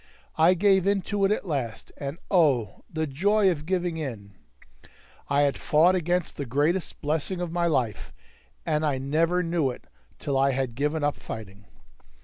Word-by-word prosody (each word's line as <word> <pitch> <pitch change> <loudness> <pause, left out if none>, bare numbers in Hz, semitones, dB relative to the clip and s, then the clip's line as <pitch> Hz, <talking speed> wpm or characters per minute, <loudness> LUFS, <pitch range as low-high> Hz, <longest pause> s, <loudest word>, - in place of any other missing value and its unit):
I 170 +4 +5
gave 190 0 +3
in 200 -1 +2
to 205 0 0
it 195 - +2
at 210 - -1
last, 135 - -4
and 140 +2 -5
oh! 140 - +2
the 160 0 -1
joy 195 +8 +2
of 155 -2 -5
giving 175 -2 -1
in! 115 -10 -6 1.0
I 140 0 +3
had 140 -1 +1
fought 165 +5 +4
against 175 -1 -1
the 140 - -3
greatest 150 +8 0
blessing 155 +5 -1
of 175 -2 -3
my 170 0 +1
life, 125 - -1 0.5
and 150 +1 0
I 145 -3 +1
never 165 +7 +1
knew 165 -5 0
it 125 - -8 0.3
till 135 -2 -1
I 135 0 +3
had 130 -2 -2
given 150 +4 -1
up 145 0 0
fighting. 100 -2 -9
155 Hz, 170 wpm, -26 LUFS, 135-180 Hz, 1.0 s, I